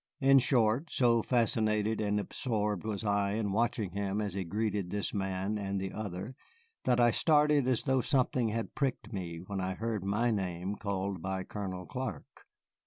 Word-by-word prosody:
In 135 0 +6
short, 120 +3 +2
so 120 -2 +3
fascinated 110 -2 +1
and 105 0 +1
absorbed 105 -3 -2
was 110 -1 -3
I 100 -1 +1
in 105 -2 -1
watching 110 -2 0
him 100 +1 -2
as 105 -3 -2
he 95 0 -2
greeted 105 0 -1
this 100 +1 -2
man 95 +1 -1
and 100 -1 -2
the 95 0 -3
other 105 +3 -5 0.5
that 125 -1 +3
I 120 -1 +6
started 150 -1 +4
as 130 -3 +2
though 130 -1 +2
something 125 -2 +1
had 115 +1 -3
pricked 130 -5 -2
me 85 -4 -4
when 100 0 -3
I 95 0 -2
heard 110 -3 -2
my 110 +5 +1
name 95 -1 -2
called 100 -3 -3
by 95 +1 -2
Colonel 95 -3 -5
Clark. 125 - -6
105 Hz, 175 wpm, -31 LUFS, 95-120 Hz, 0.5 s, In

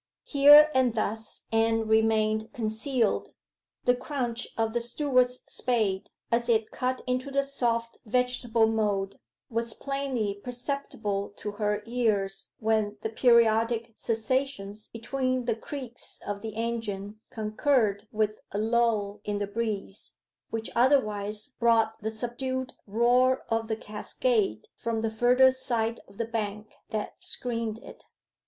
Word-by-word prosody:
Here 295 +2 +8
and 255 -3 +3
thus 220 0 -2
Anne 225 0 +2
remained 220 0 +2
concealed. 225 +1 0 0.5
The 245 - +5
crunch 245 -2 -3
of 225 -1 0
the 240 - 0
steward's 250 0 +1
spade, 215 -6 0 0.2
as 235 +1 +1
it 220 -2 +2
cut 255 0 -2
into 255 +2 -1
the 275 0 +1
soft 235 -4 -1
vegetable 245 -1 +2
mould, 205 -3 0 0.3
was 230 0 -1
plainly 260 -8 -2
perceptible 245 -6 -3
to 210 - -4
her 210 0 -1
ears 215 -5 0
when 215 -1 0
the 220 - -2
periodic 230 -1 +3
cessations 225 -3 -2
between 255 +2 -2
the 235 - +2
creaks 245 +1 -8
of 205 0 -4
the 220 -1 -6
engine 215 -3 -3
concurred 215 -1 +1
with 215 0 0
a - - -3
lull 215 -2 +1
in 205 0 -2
the 205 - -1
breeze, 205 -1 -4 0.4
which 225 0 -4
otherwise 215 -5 +2
brought 230 -2 +3
the 220 - -1
subdued 255 +3 -3
roar 245 +4 +3
of 225 0 0
the 220 -1 -2
cascade 390 - -1
from 230 -1 -2
the 225 -1 -1
further 250 +4 +5
side 235 -3 -1
of 195 - -18
the 230 - -1
bank 215 -2 -4 0.2
that 215 -1 -4
screened 230 -3 -2
it. - - -12
225 Hz, 130 wpm, -28 LUFS, 215-250 Hz, 0.5 s, Here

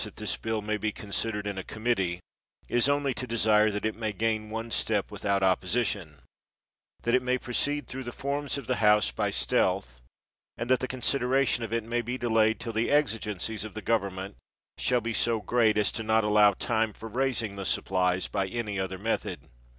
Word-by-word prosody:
165 - - -3
THE 110 - -5
WORLD'S 110 -2 -1
FAMOUS 105 0 -2
ORATIONS 105 -1 -4
sidered 105 -2 0
in 100 -1 -3
a - - -5
committee, 100 -6 -1 0.5
is 120 +3 +2
only 140 -1 +1
to 125 - -5
desire 110 -2 +4
that 105 0 -3
it 110 - 0
may 110 -1 -3
gain 110 +1 -1
one 115 +1 -5
step 105 -3 0
without 100 -1 0
opposition; 95 -4 0 0.8
that 120 - +1
it 125 - +5
may 125 0 +1
proceed 145 +4 -1
through 130 0 -6
the 120 - -4
forms 140 +3 -2
of 140 - -6
the - - 0
House 105 - +4
by - - -1
stealth; - - 0 0.6
and 120 +2 -2
that 130 - +5
the 130 - -2
consideration 130 -1 +1
of 115 - -5
it 115 -1 0
may 120 +2 -1
be 120 +2 -4
delayed 110 -2 +2
till 115 0 -4
the 110 +1 0
exigencies 110 -7 0
of 110 -1 -8
the 110 - -4
government 100 -3 -1 0.4
shall 125 -1 +2
be 115 +1 -3
so 115 +2 +1
great 110 -1 +2
as 105 - +2
not 110 0 +2
to 105 - -1
allow 105 -1 +6
time 110 +1 0
for 115 - -9
raising 115 -3 -1
the 100 - -5
supplies 95 -1 +1
by 100 -2 -1
any 105 -1 -3
other 95 0 -3
method. 110 +4 -3
110 Hz, 195 wpm, -28 LUFS, 105-120 Hz, 0.8 s, allow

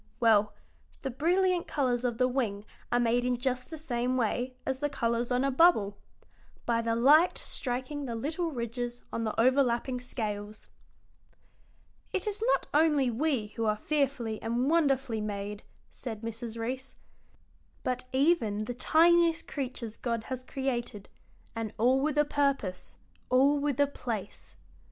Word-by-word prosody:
Well, 215 -3 +4 0.5
the 270 - -2
brilliant 350 +6 +1
colors 250 -4 0
of 240 -2 -1
the 255 - +3
wing 225 -6 -2 0.3
are 245 - +3
made 240 +1 +2
in 250 0 +1
just 250 0 -2
the 320 - -6
same 255 -4 -1
way 250 +2 -1
as 265 -1 -2
the 290 +1 0
colors 235 -2 -1
on 250 +1 +2
a 275 - +1
bubble: 255 - +4 0.7
by 230 -1 +1
the 230 0 0
light 295 +9 +5
striking 260 +3 -3
the 235 -3 -4
little 315 +8 -2
ridges 240 -2 -4
on 230 - -1
the 215 - -2
overlapping 250 0 +2
scales." 215 -4 -5 1.4
"It 380 - -1
is 420 0 -2
not - - -5
only 295 -4 +3
we 250 -4 0
who 225 +1 -3
are 215 0 +1
fearfully 265 -5 -1
and 240 +5 0
wonderfully 270 -8 +2
made," 205 0 -4 0.3
said 225 -4 -7
Mrs. 230 0 -5
Reece, 255 +4 -4 0.9
"but 255 0 -2
even 260 -7 +2
the 245 - -4
tiniest 335 +5 +4
creatures 255 -5 -5
God 230 -2 -2
has 255 +1 -5
created, 245 -6 -3 0.5
and 225 -2 -4
all 255 +4 +3
with 300 +1 0
a 295 - +5
purpose, 275 -11 -1 0.3
all 275 +3 +4
with 285 -2 -1
a 285 - +6
place." 230 -7 -6
250 Hz, 150 wpm, -29 LUFS, 230-280 Hz, 1.4 s, a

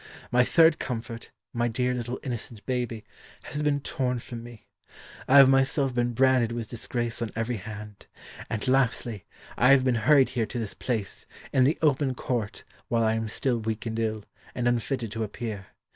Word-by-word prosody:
My 125 0 +5
third 160 +4 +5
comfort 115 -1 -5 0.2
my 120 0 +1
dear 125 +2 0
little 125 0 -4
innocent 120 -4 -6
baby 120 -4 -2 0.4
has 150 - -4
been 145 -1 +1
torn 130 -5 -1
from 120 0 -7
me. 120 -2 -12 0.6
I 140 - +6
have 135 -1 +10
myself 135 0 +2
been 120 0 0
branded 130 -1 +3
with 115 -2 -4
disgrace 120 0 -3
on 115 - -1
every 115 +1 -1
hand. 105 0 -9 0.4
And, 110 +4 -2
lastly, 125 -5 +1 0.3
I 125 - +5
have 135 -1 +6
been 130 - +3 0.2
hurried 140 -3 +6
here 115 -4 -1
to - - -6
this 110 -4 -3
place, 110 -6 -4 0.3
in 130 - +5
the 145 - +2
open 140 -3 +2
court, 120 -5 -3 0.2
while 115 -1 +1
I 110 0 +3
am 110 0 -2
still 120 +2 0
weak 110 0 -3
and 115 0 -3
ill, 110 -2 -2 0.3
and 125 -1 0
unfitted 120 -1 -1
to 110 +1 -2
appear. 105 -2 -5
120 Hz, 180 wpm, -27 LUFS, 115-130 Hz, 0.6 s, have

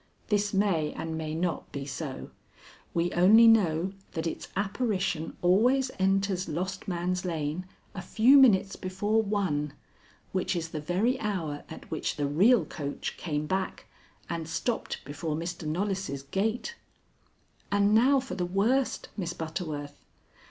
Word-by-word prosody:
This 205 -1 +1
may 195 -7 +1
and 160 0 -4
may 155 -1 -3
not 170 0 -2
be 140 -1 -5
so. 135 0 -6 0.6
We 170 +1 0
only 210 +7 +7
know 190 -5 +4 0.2
that 160 0 -3
its 165 - -4
apparition 195 -5 -1
always 245 +9 +4
enters 195 -1 +1
Lost 185 +5 -3
Man's 180 0 -1
Lane 165 0 -3 0.3
a 190 - -5
few 240 +9 +5
minutes 195 -7 +5
before 205 +4 0
one, 185 -9 -1 0.6
which 185 0 -1
is 165 -1 -3
the 155 -2 -5
very 195 - +1
hour 170 -9 -3
at 160 - -10
which 160 - -2
the 145 - -1
real 195 - +4
coach 145 -2 -5
came 150 -3 -2
back 190 +3 -2 0.4
and 165 -1 -4
stopped 225 +8 -2
before 150 +3 -3
Mr. 170 0 -4
Knollys' 185 -4 -2
gate. 215 - -1 1.0
And 205 +1 +3
now 260 +5 +5
for 255 -8 -6
the 185 -1 -2
worst, 215 +9 +1
Miss 175 -4 -3
Butterworth. 155 -3 -5
185 Hz, 140 wpm, -28 LUFS, 160-205 Hz, 1.0 s, only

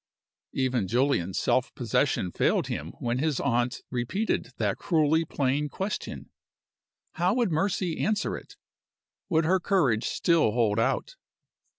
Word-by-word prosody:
Even 130 -6 0
Julian's 120 -6 +1
self - - +1
possession 90 - 0
failed - - +1
him - - -5
when 120 +1 -1
his 150 -2 0
aunt 120 -2 0
repeated 130 - -1
that - - -1
cruelly 160 -2 +2
plain 145 0 0
question. 195 +7 -5 0.8
How 180 +4 +1
would 240 -7 +1
Mercy 175 0 0
answer 210 0 0
it? - - -11 0.7
Would 160 -3 +2
her 185 +3 +3
courage 145 - +2
still 165 -11 +2
hold 115 -2 +2
out? - - -1
150 Hz, 125 wpm, -27 LUFS, 120-180 Hz, 0.8 s, her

